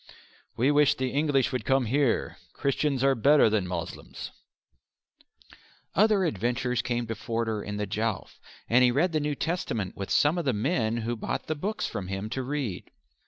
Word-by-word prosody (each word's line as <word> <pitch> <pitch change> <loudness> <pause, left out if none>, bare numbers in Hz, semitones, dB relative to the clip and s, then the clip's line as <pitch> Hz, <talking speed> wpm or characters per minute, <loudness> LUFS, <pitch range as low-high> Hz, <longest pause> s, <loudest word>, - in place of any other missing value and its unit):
We 130 +5 +3
wish 145 -1 +4
the 130 -1 -2
English 145 -3 +1
would 130 -4 -2
come 135 +1 +2
here; 130 +1 +1 0.2
Christians 140 -1 0
are 135 0 +5
better 135 -1 +5
than 105 -4 +1
Moslems." 85 -2 -6 1.6
Other 205 0 +4
adventures 125 - 0
came 120 -1 -2
to 115 - -3
Forder 115 -1 -2
in 105 0 -5
the 105 - -1
Jowf, 105 +1 -3 0.3
and 125 +2 +5
he 125 - +6
read 150 +9 +2
the 155 - +1
New 150 0 -1
Testament 125 - -2
with 100 - -5
some 150 +4 +3
of 170 - -3
the 130 - +2
men 115 0 0
who 120 +1 -1
bought 110 - -4
the 155 - -1
books 195 +8 -3
from 95 - -4
him 100 +3 -4
to 130 - -2
read. 130 -7 -4
125 Hz, 175 wpm, -27 LUFS, 110-145 Hz, 1.6 s, he